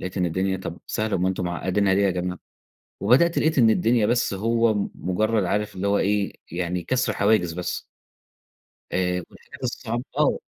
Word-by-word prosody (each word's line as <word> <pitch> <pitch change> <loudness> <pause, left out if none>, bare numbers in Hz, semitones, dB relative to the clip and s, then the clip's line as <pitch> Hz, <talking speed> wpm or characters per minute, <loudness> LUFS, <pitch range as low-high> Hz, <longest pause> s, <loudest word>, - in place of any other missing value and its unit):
لقيت 90 +1 -6
إن 90 -2 +1
الدنيا 95 +3 0
طَب 95 - -7
سهلة 110 -1 -1
أُمّال 90 0 0
أنتم 95 -1 -2
معقدينها 95 +3 +1
ليه 100 - +2
يا 100 - +3
جماعه، 90 0 -3 0.6
وبدأت 170 +7 +4
لقيت 155 -1 +2
إن 115 -4 +6
الدنيا 115 0 +3
بس 120 -1 +1
هو 115 +3 +2
م 105 -1 -1
مجرّد 105 +4 0
عارف 105 +3 -1
اللي 95 +2 -2
هو 100 0 +3
إيه 100 0 0 0.2
يعني 90 +1 -2
كسر 125 +2 0
حواجز 100 -6 +2
بس. 90 +1 -4 1.1
آآ، 90 0 0
والحاجات - - -15
الصعبة 120 -1 -3
آه. - - +3
100 Hz, 175 wpm, -24 LUFS, 90-110 Hz, 1.1 s, إن